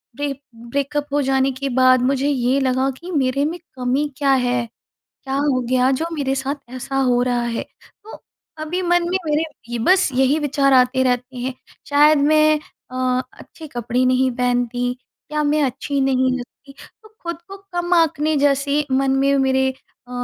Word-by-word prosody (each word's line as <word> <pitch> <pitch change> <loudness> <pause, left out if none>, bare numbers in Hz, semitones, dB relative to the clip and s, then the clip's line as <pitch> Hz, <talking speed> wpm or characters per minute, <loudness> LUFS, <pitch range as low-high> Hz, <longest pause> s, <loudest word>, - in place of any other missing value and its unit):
ब्रे 285 +1 -2 0.2
ब्रेकअप 280 +5 -3
हो 290 - +2
जाने 270 0 +1
के 275 +2 -4
बाद 255 -1 +5
मुझे 270 +1 +1
ये 260 0 +1
लगा 260 0 +1
कि 350 +2 -8
मेरे 275 -2 +1
में 340 +3 -3 0.2
कमी 260 +3 0
क्या 275 -2 +2
है, 245 -2 +1 0.6
क्या 270 0 -3
हो 280 -2 +1
गया 255 +1 +3
जो 325 - 0
मेरे 275 -3 -1
साथ 275 +2 -2 0.2
ऐसा 270 +1 -5
हो 250 -2 +2
रहा 245 -1 0
है। 235 -1 -2 0.4
तो 440 - -10 0.4
अभी 350 +4 -2
मन 350 0 +2
में 375 - +1
मेरे 300 +1 +1 0.2
ये 240 -1 -3
बस 365 +10 +3
यही 265 +3 +3
विचार 280 -2 +1
आते 255 0 +4
रहते 250 0 -1
हैं, 255 +1 -3 0.4
शायद 295 +1 +5
मैं 305 +1 +4 0.3
अ, 255 0 0
अच्छे 320 - -13
कपड़े 245 0 -1
नहीं 255 +1 +2
पहनती, 245 0 0 0.4
क्या 300 0 -1
मैं 295 +1 +2
अच्छी 275 +2 -2
नहीं 260 -1 +2
लगती, 275 +3 -12 0.3
तो 435 - -16
खुद 340 0 -5
को 390 - -8 0.2
कम 350 0 0
आँकने 310 -2 +2
जैसी 285 +1 +1
मन 270 0 +2
में 275 +1 +3
मेरे 265 0 +2
अ, 255 -1 -18
270 Hz, 175 wpm, -20 LUFS, 255-295 Hz, 0.6 s, बाद